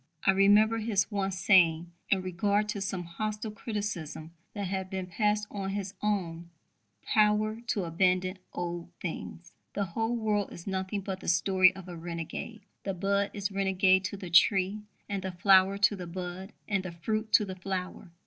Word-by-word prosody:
I 195 - +7
remember 205 +3 +5
his 215 -2 0
once 195 -2 -1
saying, 175 -5 +4 0.2
in 190 -2 +2
regard 200 +4 +1
to 205 -2 -3
some 190 -2 -2
hostile 215 +5 -4
criticisms 205 -8 -5 0.2
that 200 -1 -2
had 190 0 -3
been 190 -1 -3
passed 210 +3 0
on 195 -2 -3
his 195 -1 -4
own 175 -5 -2 0.5
"power 215 +1 +2
to 205 -3 0
abandon 185 +2 +1
old 175 -1 -4
things": 175 0 -6 0.2
"The 200 - -1
whole 225 +7 -1
world 210 -3 0
is 170 - -10
nothing 190 +1 -2
but 190 -1 -5
the - - -10
story 185 +2 +5
of 190 -1 -10
a 175 - -7
renegade. 170 +6 -6 0.2
The 195 -1 -2
bud 200 +2 +1
is 200 -1 -2
renegade 190 -1 +3
to 200 - -4
the 185 -3 -8
tree, 190 +4 +4 0.3
and 200 -1 -3
the 190 -1 -4
flower 190 +2 +5
to 205 +1 +3
the 180 -3 -7
bud, 180 +3 -6
and 200 -2 +1
the 185 -2 -6
fruit 215 +6 -2
to 210 - +6
the 190 -1 -6
flower." 185 -1 -5
195 Hz, 175 wpm, -29 LUFS, 180-205 Hz, 0.5 s, I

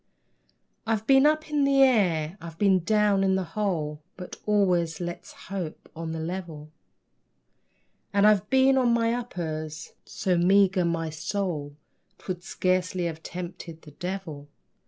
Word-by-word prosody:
I've 220 -1 0
been 270 +3 +6
up 310 0 0
in 295 -1 +2
the 275 -1 +5
air, 180 -10 +2
I've 165 -1 -9
been 190 -3 +3
down 210 0 +2
in 190 -1 +2
the 190 - 0
hole, 160 -8 -2 0.2
(But 180 -1 -8
always, 180 -6 +2
let's 175 -1 -6
hope, 185 -5 -7
on 165 0 -5
the 160 - -4
level,) 160 -3 -6 1.4
And 200 0 +3
I've 210 -1 +4
been 265 0 +4
on 240 -2 +3
my 230 0 +1
uppers 155 -10 -5
so 180 -2 -1
meagre 190 0 +4
my 165 -1 -1
sole 155 -2 -3 0.4
'Twould 180 -2 -6
scarcely 185 -1 0
have 160 -1 -4
tempted 170 -2 -8
the 150 - -13
devil! 170 -4 -6
185 Hz, 140 wpm, -26 LUFS, 165-210 Hz, 1.4 s, been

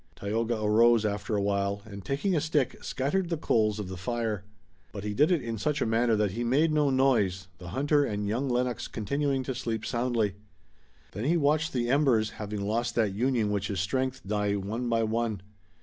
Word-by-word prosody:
Tayoga 115 +3 -1
arose, 115 +1 +4
after 105 +1 -2
a 100 - +1
while, 100 0 -1
and 100 -2 -9
taking 145 - 0
a 155 - +2
stick, 150 -4 0
scattered 170 +7 -1
the 165 - -1
coals 110 -7 +1
of 105 -3 -4
the 95 - -6
fire. 110 0 -2 0.5
But 100 - -7
he 105 0 -2
did 150 - +3
it 170 -6 +2
in 115 -2 -4
such 150 +6 0
a - - +1
manner 115 0 +2
that 105 -2 +1
he 115 +5 -3
made 145 +7 +3
no 150 -2 +3
noise, 110 -9 +2
the 90 - -9
hunter 145 - +2
and 105 -5 -2
young 125 +6 -1
Lennox 125 0 -1
continuing 135 +4 -1
to 130 - -3
sleep 115 -3 -3
soundly. 120 -5 0 0.8
Then 105 +5 -4
he 170 +4 +3
watched 155 +2 +2
the 120 -2 -1
embers, 125 -5 +3
having 105 -1 -5
lost 115 +3 -1
that 110 -4 +1
union 115 -1 +1
which 100 -1 -1
is 100 -3 -2
strength, 130 +7 -1
die 105 -1 0
one 110 +5 -3
by 115 -1 +2
one. 110 -3 -1
115 Hz, 200 wpm, -28 LUFS, 105-135 Hz, 0.8 s, arose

